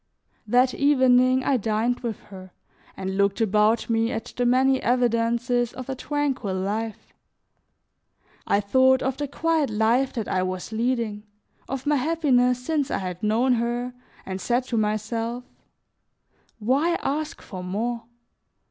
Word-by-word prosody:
That 250 +3 +3
evening 260 -2 +4
I 270 -1 +2
dined 225 +2 0
with 230 -4 -4
her, 185 -1 -11 0.4
and 190 0 -4
looked 200 +1 +2
about 215 +1 +2
me 230 0 +1
at 225 -2 -5
the 245 -1 +1
many 260 +2 +3
evidences 240 0 +1
of 255 0 -8
a - - -1
tranquil 270 -8 -2
life; 210 +4 -4 1.3
I 200 - +2
thought 260 +5 +3
of 265 0 -1
the 290 - -3
quiet 320 0 0
life 225 +5 +2
that 225 -4 -3
I 185 - 0
was 185 +2 -4
leading, 225 -2 -2 0.4
of 270 -1 -4
my 295 0 +2
happiness 250 -4 +2
since 295 -3 0
I - - -1
had 180 -2 -5
known 230 +5 +2
her, 240 +1 -2 0.3
and 190 0 -5
said 245 +1 +1
to 235 - -1
myself: 225 +3 -1 1.1
"Why 275 +10 +1
ask 305 +3 -2
for 185 -2 -8
more? 230 +6 -3
240 Hz, 140 wpm, -24 LUFS, 215-260 Hz, 1.3 s, evening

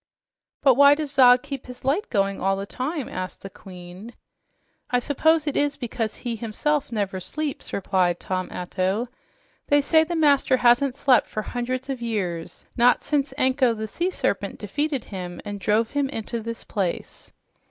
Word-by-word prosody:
"But 270 -2 +7
why 280 +3 +7
does 300 -2 -4
Zog 250 -3 +6
keep 275 -3 -7
his 250 0 -11
light 305 +11 0
going 195 -2 0
all 195 0 +2
the 195 +1 -4
time?" 265 +6 -4
asked 185 0 -6
the 195 - -8
Queen. 185 +5 -11 0.7
"I 245 - +2
suppose 300 +5 +2
it 290 - -2
is 290 -1 +1
because 230 -3 -3
he 240 -2 -4
himself 270 +6 -1
never 200 -4 -2
sleeps," 300 - -5
replied 185 -3 +1
Tom 185 -1 -3
Atto. 190 +6 -2 0.6
"They 290 - +4
say 315 +3 +4
the 340 +2 -4
master 285 -4 +3
hasn't 245 +2 +3
slept 265 -4 +3
for 215 - -4
hundreds 250 +3 -3
of 265 -3 -4
years, 185 -8 -4
not 245 0 +4
since 285 -2 0
Anko, 260 -3 +2
the 220 0 -4
sea 345 - -1
serpent, - - -2
defeated 290 -4 -2
him 180 -3 -7
and 205 -1 -5
drove 215 +3 +1
him 285 -1 0
into 230 -2 -4
this 230 +1 -6
place." 190 -5 -4
245 Hz, 170 wpm, -24 LUFS, 200-280 Hz, 0.7 s, But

